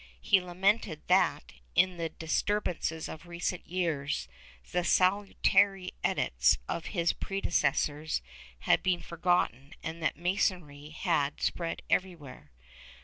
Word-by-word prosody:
He 190 - +4
lamented 180 -1 0
that, - - +2 0.2
in 185 -1 +3
the 165 -1 -2
dis 160 0 -1
turbances 175 -6 -2
of 160 +3 -9
recent 175 +1 -3
years, 155 - -1 0.4
the 180 - +1
salutary 195 0 +3
edicts - - +2
of 165 - -3
his 170 -4 +1
predecessors 155 - 0 0.4
had - - +3
been 180 -2 0
forgotten 170 - 0
and 160 +1 -5
that 155 - 0
Masonry 170 -5 -1
had 155 -3 0
spread 170 -1 -2
everywhere. 160 - -2
170 Hz, 115 wpm, -30 LUFS, 155-185 Hz, 0.4 s, He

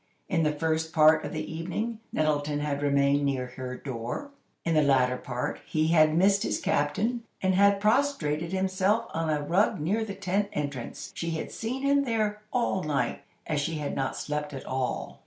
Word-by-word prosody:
In 175 -4 +1
the 155 -1 +2
first 160 +1 -1
part 155 0 +6
of - - -4
the 155 0 -4
evening, 200 +8 -3
Nettleton 150 -1 0
had 145 -1 -2
remained 140 0 +3
near 135 -2 0
her 125 -1 -5
door; 130 - -5 0.3
in 165 - +1
the 155 - +5
latter 130 -3 +3
part, 125 -1 -4
he 155 0 +1
had 155 -1 +5
missed 195 +2 +4
his - - -1
captain, 205 +12 0 0.2
and 190 0 +2
had 200 +1 +5
prostrated 200 - +1
himself 190 +4 +1
on 165 0 -1
a 150 -1 0
rug 175 +6 +2
near 200 +9 0
the 200 -3 -5
tent 200 +1 -1
entrance. 140 -4 -4
She 170 - -3
had 160 -1 -3
seen 255 +4 -4
him 280 0 +3
there 215 -4 -1
all 235 -6 +1
night, 140 -7 -1 0.2
as 150 -2 0
she 165 +3 -2
had 150 -2 -3
not 135 -1 -2
slept 150 -1 -3
at 130 - -7
all. 130 -1 -3
160 Hz, 185 wpm, -28 LUFS, 145-200 Hz, 0.3 s, part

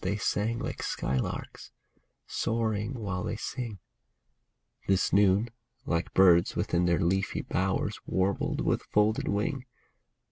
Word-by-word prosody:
They 100 +3 0
sang 110 +2 0
like - - -4
skylarks, 65 -1 -3 0.6
soaring 110 +1 -1
while 100 -6 -3
they - - -2
sing; 115 -1 -5 1.1
This 95 -1 +2
noon, 100 +3 +4 0.3
like 85 +1 -2
birds 90 -3 +5
within 85 +1 +1
their 85 -1 +3
leafy 95 +1 0
bowers, 95 +1 -1
Warbled 95 +1 0
with - - +1
folded 105 +1 +1
wing. 125 +6 -1
100 Hz, 115 wpm, -29 LUFS, 95-110 Hz, 1.1 s, birds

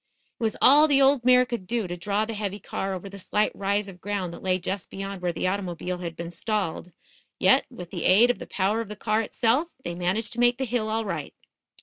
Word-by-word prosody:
It - - -18
was 220 -1 0
all 295 +3 +8
the 280 -2 +4
old 270 -2 +4
mare 250 0 +6
could 235 -7 -5
do 230 0 -1
to 175 - -4
draw 200 +4 -1
the 225 - -5
heavy 205 -1 -4
car 195 -1 -4
over 185 +2 -7
the 200 0 -9
slight 210 +3 +1
rise 200 +1 -1
of 180 -2 -12
ground 195 -3 -3
that - - -10
lay 185 -1 +1
just 190 +1 -4
beyoud 195 -1 -6
where 180 -1 0
the 170 - -3
automobile 180 -2 -2
had 170 -2 -5
been 170 +1 -6
stalled; 180 -2 -3 0.5
yet, - - +4
with 175 -1 -10
the - - -4
aid 225 +7 +6
of - - -7
the - - -8
power 200 +4 0
of 225 - -7
the 210 - -6
car 215 +1 0
itself, 235 +7 +1 0.2
they 175 - -4
managed 180 +6 -1
to 240 - -6
make 240 0 +4
the 265 - -1
hill 230 -2 -1
all 220 +1 -1
right. 165 -7 -5
200 Hz, 245 wpm, -26 LUFS, 180-230 Hz, 0.5 s, all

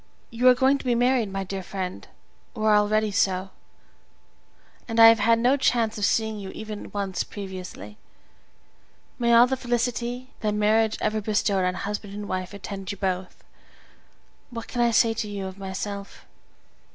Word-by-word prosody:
You 235 +2 +2
are 250 - +8
going 265 +2 +3
to - - -11
be 245 -1 +2
married, 245 -3 +2
my 195 0 -3
dear 195 0 -5
friend, 185 0 -6 0.5
or 215 -1 +2
are 210 - +6
already 215 +1 +2
so, 190 -2 0 1.4
and 225 -1 -1
I 225 0 +11
have 225 0 +4
had 230 +2 +4
no 250 +4 +3
chance 235 -4 +1
of 210 - 0
seeing 220 -1 0
you 195 -1 -7
even 215 -1 -7
once 195 -3 -2
previously. 185 - -8 1.2
May 235 -1 +2
all 235 +1 +8
the 265 +1 -1
felicity 245 0 -2
that 210 -1 -1
marriage 215 +1 +2
ever 215 0 0
bestowed 205 -2 +1
on 180 0 0
husband 205 +1 -5
and 205 0 -6
wife 185 -1 -3
attend 200 -1 -6
you 205 - -7
both! 185 -1 -3 1.1
What 230 -3 -7
can 245 - -2
I 235 - +4
say 230 0 +3
to 220 -1 -4
you 200 -1 -5
of 190 +1 -8
myself? 195 +1 -6
210 Hz, 170 wpm, -25 LUFS, 195-230 Hz, 1.4 s, I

